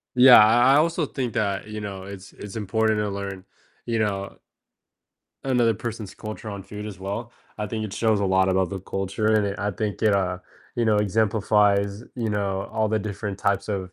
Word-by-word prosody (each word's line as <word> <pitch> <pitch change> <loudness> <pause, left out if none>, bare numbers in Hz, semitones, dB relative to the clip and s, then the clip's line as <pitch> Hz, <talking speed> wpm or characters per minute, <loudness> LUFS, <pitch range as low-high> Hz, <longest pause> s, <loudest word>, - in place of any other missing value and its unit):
Yeah, 125 0 +9
I 120 +5 +5
I - - +6
also 165 0 +2
think 125 -5 -4
that, 100 -1 -1
you 105 0 -6
know, 95 -2 -6
it's 100 0 -10
it's 105 +1 -9
important 110 +1 +1
to 105 - -1
learn, 100 -1 -5 0.4
you 115 -1 0
know 100 -2 -2 1.1
another 120 -4 +2
person's 110 -1 -6
culture 110 0 -7
on 100 -2 -6
food 105 +2 -8
as 100 -4 -8
well. 100 +5 -5 0.3
I 105 - -2
think 110 +1 -3
it 100 - -6
shows 110 -2 +1
a - - +1
lot 95 0 +3
about 95 -1 +1
the 95 - -4
culture, 95 +3 -3
and 105 -1 +3
it 100 -1 -4
I 105 +3 -1
think 105 +2 -3
it, 105 -2 +4
uh, 90 -2 0 0.4
you 120 - +1
know, 110 -1 +3
exemplifies, 105 -1 +2
you 115 -3 -2
know, 100 -2 -1
all 110 -1 +1
the 110 0 +1
different 100 -1 -5
types 100 +1 0
of 95 -3 -3
105 Hz, 205 wpm, -24 LUFS, 100-110 Hz, 1.1 s, Yeah